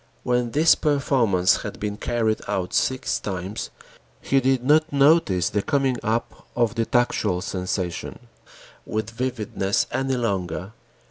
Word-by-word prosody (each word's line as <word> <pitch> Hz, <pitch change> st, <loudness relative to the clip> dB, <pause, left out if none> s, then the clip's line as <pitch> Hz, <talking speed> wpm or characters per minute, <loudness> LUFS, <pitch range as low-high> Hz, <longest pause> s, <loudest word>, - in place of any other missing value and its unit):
When 125 Hz, -1 st, +1 dB
this 155 Hz, +6 st, +5 dB
performance 125 Hz, -11 st, +2 dB
had -, -, -7 dB
been 105 Hz, -1 st, -3 dB
carried 110 Hz, 0 st, -1 dB
out 90 Hz, -1 st, -2 dB
six 130 Hz, 0 st, 0 dB
times, 95 Hz, +1 st, -5 dB, 0.5 s
he 135 Hz, -, +2 dB
did 130 Hz, -1 st, +1 dB
not 155 Hz, +4 st, +3 dB
notice 140 Hz, -, +3 dB
the 105 Hz, -, 0 dB
coming 135 Hz, 0 st, 0 dB
up 115 Hz, +2 st, -3 dB
of 120 Hz, -2 st, +1 dB
the 115 Hz, -1 st, -1 dB
tactual 110 Hz, -6 st, +1 dB
sensation 90 Hz, -2 st, -3 dB, 0.7 s
with 110 Hz, 0 st, -3 dB
vividness 115 Hz, -5 st, -1 dB
any 135 Hz, -1 st, 0 dB
longer. 95 Hz, -4 st, -2 dB
115 Hz, 130 wpm, -23 LUFS, 100-130 Hz, 0.7 s, this